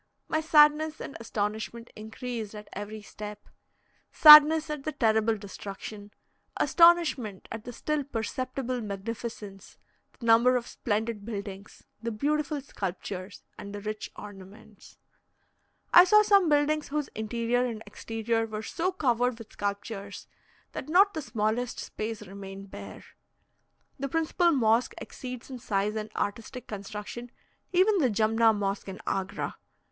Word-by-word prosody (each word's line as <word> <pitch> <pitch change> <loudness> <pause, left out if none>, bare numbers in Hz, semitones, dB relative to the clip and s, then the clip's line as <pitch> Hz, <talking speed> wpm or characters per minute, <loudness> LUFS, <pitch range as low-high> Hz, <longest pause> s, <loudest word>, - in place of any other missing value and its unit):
My 315 - 0
sadness 305 0 +4
and - - -7
astonishment 220 +1 -4
increased 220 0 -6
at 210 0 -9
every 210 +1 -7
step 210 0 -9 0.6
sadness 305 +1 +9
at 300 -2 -5
the 310 - -3
terrible 220 0 +2
destruction, 205 +1 -8 0.5
astonishment 335 - +3
at 225 -1 -6
the 245 - -6
still 300 +4 -2
perceptible 255 0 -3
magnificence, 205 -1 -7 0.4
the 235 - -9
number 235 +2 +5
of 245 -1 -1
splendid 220 -2 -3
buildings, 200 -2 -7 0.2
the 230 - -2
beautiful 295 +6 -1
sculptures, 195 -4 -6 0.2
and 200 0 -7
the - - -5
rich 215 +1 -5
ornaments. 205 +1 -13 1.0
I 350 - +11
saw 425 +3 +6
some 400 -5 +4
buildings 295 +1 +2
whose 295 0 -2
interior 235 +3 -1
and 225 -3 -4
exterior 225 0 -2
were 215 0 -5
so 345 +10 -1
covered 245 -8 +1
with 230 -2 -12
sculptures, 200 0 -5 0.4
that - - -7
not 390 +5 +5
the 315 - -3
smallest 230 -1 -2
space 215 0 -5
remained 195 0 -10
bare. - - -10 0.9
The 275 +1 -3
principal 325 +3 +2
mosque 235 -5 +2
exceeds 255 0 -8
in 255 - -6
size 210 -1 -1
and 215 0 -4
artistic 230 +4 -4
construction 210 +4 -7 0.4
even 380 +2 +4
the 265 -6 +3
Jumna 225 +1 +3
Mosque 200 -1 -2
in 190 - -8
Agra. 195 +1 -3
225 Hz, 130 wpm, -28 LUFS, 210-275 Hz, 1.0 s, I